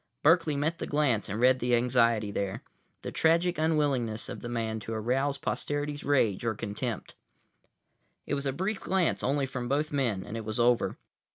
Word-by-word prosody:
Berkeley 165 -1 +4
met 155 +4 -1
the - - -4
glance 140 -9 +1
and 100 +3 -3
read 130 +1 +5
the 120 0 +2
anxiety 115 -3 +2
there, 100 -1 -3 0.4
the - - -4
tragic 170 +1 +2
unwillingness 140 -8 +1
of - - -6
the 120 - -5
man 110 -2 -2
to 110 +2 -6
arouse 130 +6 0
posterity's 145 +1 -3
rage 120 -9 +2
or 115 -2 0
contempt. 110 +1 -4 1.1
It - - -3
was 140 0 -1
a - - +1
brief 190 +8 -2
glance 185 -3 +1
only 140 +1 +1
from 125 -2 -5
both 150 +3 0
men 120 -9 0
and 105 - -7
it 115 - -4
was 110 +2 -4
over. 120 0 +2
130 Hz, 180 wpm, -29 LUFS, 115-145 Hz, 1.1 s, read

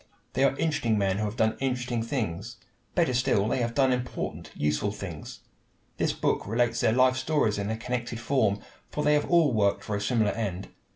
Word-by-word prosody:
They 130 - +2
are 135 - +1
interesting 150 -9 +1
men 100 -1 +1
who 110 - 0
have 105 +1 -4
done 110 -1 +2
interesting 125 -3 -1
things. 115 - -3 0.4
Better 165 -7 +2
still, 115 -5 +2
they 120 - 0
have 115 0 -2
done 135 -2 +4
important, 125 0 -4
useful 75 +8 0
things. 95 -7 -8 0.6
This - - +1
book - - -1
relates 115 +2 +1
their - - +3
life 130 +2 +4
stories 130 -6 +1
in 100 +1 -2
a 110 - -2
connected 120 0 -3
form, 110 -6 +1 0.3
for 150 - -3
they 150 - +4
have 150 - +1
all 165 -6 +4
worked 100 -2 +2
for 105 - -3
a 100 - -2
similar 110 -1 +2
end. 100 -4 -4
115 Hz, 195 wpm, -27 LUFS, 105-130 Hz, 0.6 s, done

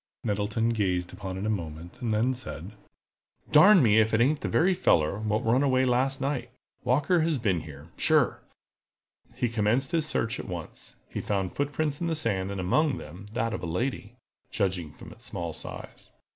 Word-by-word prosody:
Nettleton 105 +2 0
gazed 90 -6 -1
upon 95 -1 -6
it 95 - -4
a - - 0
moment, 85 - -6
and 120 -3 -1
then 115 +5 +2
said: 100 -7 -5 0.8
"Darn 185 +3 +8
me 110 -2 +5
if 110 +1 +3
it - - +2
ain't 145 +5 +2
the - - -2
very 185 +3 +3
feller 85 - +2
what 110 0 -1
run 120 +4 +3
away 130 -2 +3
last 130 +2 +1
night. 130 -3 -2 0.3
Walker 140 +8 +2
has 160 -2 +1
been 100 -9 0
here, 75 +1 -11
sure!" - - +2 1.0
He 120 - 0
commenced 115 +5 +1
his 165 -3 +1
search 115 -6 -1
at - - -6
once. 85 -3 -8
He - - -5
found 95 -3 -2
footprints 145 +1 -2
in 170 - 0
the 165 - 0
sand, 100 -10 0
and 100 -1 -4
among 135 - +2
them 90 +7 -10
that 115 -2 -1
of - - -4
a 85 - -4
lady, 115 +5 -3 0.3
judging 90 -7 -1
from - - -12
its - - -14
small - - -4
size. - - -8
115 Hz, 185 wpm, -27 LUFS, 95-135 Hz, 1.0 s, Darn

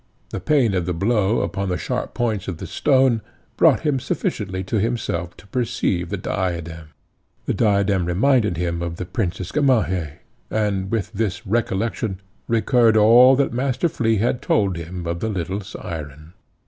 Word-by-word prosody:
The - - -3
pain 135 -9 +2
of 90 -2 -1
the 90 - -1
blow 105 +3 +1
upon 100 0 -2
the 90 - 0
sharp - - -4
points 110 -5 -1
of 90 -4 -4
the - - -7
stone 130 -5 +2 0.3
brought 160 -5 +4
him 150 -4 +1
sufficiently 95 -6 -3
to 105 +4 -1
himself 95 -7 -2
to - - -15
perceive 100 -7 -1
the 100 - -2
diadem. 85 -4 -3 0.6
The - - 0
diadem 100 -4 +2
reminded 105 - +2
him 85 -1 -2
of 85 -1 -3
the 90 - -5
Princess 90 -2 -3
Gamaheh, 95 - +1 0.4
and 100 -3 -1
with 110 -2 -2
this 100 -2 -2
recollection 110 -1 -1 0.3
recurred 115 0 +3
all 120 +5 +7
that 135 -2 +1
Master 130 +6 0
Flea 115 -8 0
had 120 +4 0
told 100 -4 +1
him 85 +1 -6
of 85 0 -2
the 110 - -2
little 95 0 -3
syren. 80 -4 -8
100 Hz, 160 wpm, -22 LUFS, 90-115 Hz, 0.6 s, all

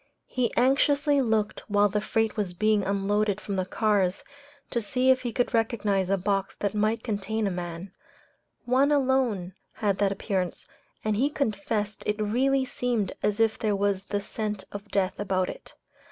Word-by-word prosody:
He 250 -2 -1
anxiously 280 +3 +3
looked 220 -4 0
while 205 0 +4
the 210 +1 -1
freight 225 +1 0
was 200 -5 -2
being 215 +2 +3
unloaded 200 +1 0
from 200 -1 -4
the 185 -1 -1
cars, 200 -4 +1 0.5
to 235 - 0
see 255 +4 +3
if 255 0 +2
he 245 -2 -3
could 245 +3 0
recognize 210 -5 +1
a 195 - +3
box 195 +1 -1
that 205 -1 -2
might 215 +2 0
contain 215 0 -2
a 195 - 0
man; 175 +1 -5 0.7
one 265 +4 +3
alone 255 -10 +1 0.2
had 200 -3 -1
that 200 -1 +3
appearance, 190 -2 -2 0.4
and 215 -1 +1
he 275 +6 +2
confessed 215 -5 -2
it 210 0 0
really 260 +6 +2
seemed 240 -6 -1
as 210 +1 0
if 225 -1 +2
there 210 -2 +1
was 200 -1 0
the 205 0 -2
scent 210 -1 -3
of 205 +1 -8
death 195 -1 0
about 190 -2 0
it. - - -10
210 Hz, 170 wpm, -27 LUFS, 195-235 Hz, 0.7 s, while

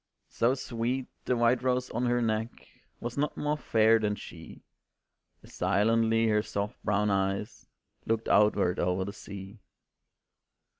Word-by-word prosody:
So 120 +3 +1
sweet, 125 0 -2 0.2
the 125 - +1
white 120 +1 +3
rose 125 0 0
on 120 +2 -1
her 120 0 +1
neck 110 0 0 0.5
Was 120 +3 -5
not 150 - -1
more 150 0 0
fair 115 -5 +3
than 105 -1 0
she, - - -11 0.8
As - - -16
silently 115 +1 +2
her 105 0 +3
soft 100 0 -4
brown 105 0 +1
eyes 95 +2 -2 0.4
Looked 115 0 0
outward 105 -3 +3
o'er 90 +1 0
the 100 - -6
sea. 100 +2 -10
115 Hz, 140 wpm, -29 LUFS, 105-120 Hz, 0.8 s, white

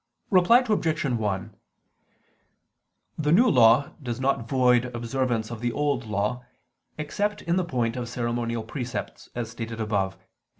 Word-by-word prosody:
Reply 200 +7 +6
Obj. 170 -7 +1
1: 105 -7 -2 1.6
The 150 -1 +1
New 230 +10 +6
Law 120 - +5
does 120 -3 -4
not 130 -4 0
void 125 -2 +4
observance 120 -1 -1
of 115 -1 -6
the 120 0 0
Old 145 -3 -1
Law 105 +4 -1 0.5
except 205 +8 -2
in 170 +1 0
the 185 - +2
point 120 -8 -1
of 120 -2 -4
ceremonial 120 -1 -2
precepts, 125 +2 -6
as 115 -2 -4
stated 115 -1 -6
above 100 -3 -1
(Q. - - -32
120 Hz, 140 wpm, -26 LUFS, 115-145 Hz, 1.6 s, Reply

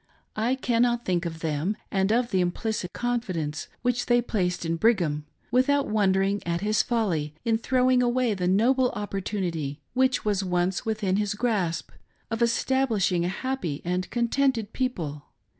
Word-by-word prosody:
I 230 +4 +1
cannot 240 -2 +1
think 175 -1 0
of 165 -1 -7
them 160 +6 -1
and 195 +1 +1
of 240 +1 +1
the 185 - +2
implicit 180 +1 -2
confidence 185 -11 -2 0.2
which 245 -1 0
they 240 0 +4
placed 180 -7 -1
in 165 0 0
Brigham, 165 -8 +1 0.2
without 280 +3 +3
wondering 195 -1 +2
at 170 0 -2
his 210 +1 +2
folly 170 -11 -1
in 225 -1 +2
throwing 255 +1 +3
away 245 -1 +2
the 180 -3 -1
noble 245 +7 +3
opportunity, 185 -8 -3
which 260 -1 +2
was 205 -2 +1
once 180 +2 0
within 210 -4 0
his 205 -1 0
grasp, 205 -8 -1 0.4
of 225 +1 -2
establishing 230 -6 +2
a - - 0
happy 195 - -3
and 180 +1 -1
contented 240 -2 0
people. 165 - -3
210 Hz, 150 wpm, -26 LUFS, 180-240 Hz, 0.4 s, they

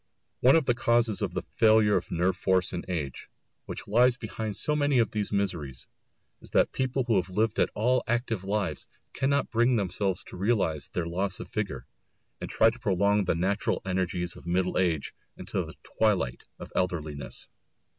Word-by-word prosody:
One 130 +4 +6
of 160 -4 +3
the 120 - +3
causes 115 -2 +2
of - - -2
the - - -2
failure 110 -2 +4
of 90 - -1
nerve 90 +2 +1
force 95 -1 +1
in 90 - -3
age, 75 -8 -4 0.4
which - - -7
lies 120 +4 +4
behind 110 -2 -5
so 150 - +1
much 145 -1 +1
of 120 -4 +3
these 105 -1 -2
miseries, 85 - -2 0.5
is - - -9
that - - +3
people 130 0 -1
who 115 -4 +2
have 90 0 0
lived 110 +4 0
at - - +3
all 125 +4 +2
active 115 -4 -1
lives 100 -6 -2 0.3
cannot 140 +1 0
bring 120 +2 +3
themselves 95 -2 -1
to - - -11
realise 95 -7 0
their 85 - -3
loss 90 +3 -1
of - - -8
vigour, 100 - -3 0.5
and - - -5
try 110 +1 +4
to 120 - -12
prolong 100 -1 +2
the 90 - +1
natural 95 +4 0
energies 90 -2 -1
of - - -13
middle 90 +1 +1
age 85 -6 0 0.2
into - - -3
the - - -10
twilight 95 - 0
of - - -10
elderliness. 80 -6 -3
100 Hz, 180 wpm, -28 LUFS, 90-115 Hz, 0.5 s, One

